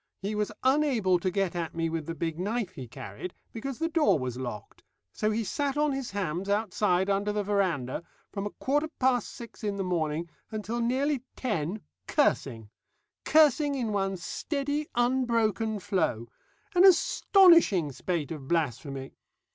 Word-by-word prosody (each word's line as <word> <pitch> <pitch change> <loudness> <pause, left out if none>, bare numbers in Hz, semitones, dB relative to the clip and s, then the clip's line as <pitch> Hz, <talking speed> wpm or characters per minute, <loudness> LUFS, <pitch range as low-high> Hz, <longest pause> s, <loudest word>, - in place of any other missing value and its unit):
He 205 +2 -2
was 210 0 -1
unable 260 -10 +3
to 185 - 0
get 190 -1 -1
at 165 -2 -3
me 165 0 0
with 160 -2 -3
the 165 - -4
big 165 -1 -3
knife 210 +1 -1
he 130 -8 -8
carried, 105 - -8 0.2
because 260 +3 -5
the 325 - 0
door 325 - +3
was 130 -3 -3
locked, 120 -5 -7 0.3
so 215 - 0
he 220 +1 0
sat 280 +5 -2
on 300 0 +2
his 270 -2 -3
hams 190 -1 -3
outside 200 -3 +1
under 200 +1 +1
the 210 0 -1
verandah, 185 -12 0 0.3
from 200 0 -3
a - - -4
quarter 290 +8 0
past 255 -3 +2
six 235 -1 -11
in 205 -1 -1
the 195 - -2
morning 165 -2 -1 0.2
until 220 +2 -3
nearly 265 +3 +1
ten, 205 - -2 0.3
cursing 115 - 0 0.5
cursing 300 -2 +4
in 240 -5 -1
one 195 -1 0
steady 290 - -3
unbroken 230 -3 +1
flow 160 - -1 0.5
an 360 0 +5
astonishing 335 - +5
spate 165 +1 -3
of 145 -5 -7
blasphemy. 140 -4 -2
205 Hz, 155 wpm, -28 LUFS, 170-255 Hz, 0.5 s, an